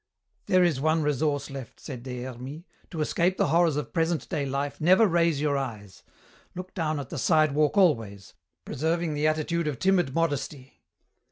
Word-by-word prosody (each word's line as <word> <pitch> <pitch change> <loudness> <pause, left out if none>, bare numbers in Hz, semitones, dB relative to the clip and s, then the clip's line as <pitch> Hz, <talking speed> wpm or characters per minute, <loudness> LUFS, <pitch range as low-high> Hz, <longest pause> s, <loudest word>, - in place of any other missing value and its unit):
"There 185 -3 +4
is 155 -7 +1
one 155 +1 +2
resource 145 -1 -1
left," 130 -3 -9
said 130 -5 -8
Des 125 -1 -6
Hermies. 130 +5 -8 0.3
"To 165 -4 -4
escape 175 +4 +1
the - - +1
horrors 165 -1 +3
of 150 - -4
present 165 -4 0
day 150 -6 -2
life 140 +2 -3
never 185 +7 +5
raise 170 -5 +2
your 145 -1 +1
eyes. 105 -8 -7 0.5
Look 185 +1 -7
down 155 -4 -1
at 140 - -8
the 165 - -4
sidewalk 155 - +2
always, 110 - +1 0.3
preserving 160 +2 -1
the 150 +1 +1
attitude 155 +1 0
of 145 -4 -2
timid 180 -4 +1
modesty. 145 -4 -3
150 Hz, 170 wpm, -26 LUFS, 135-170 Hz, 0.5 s, never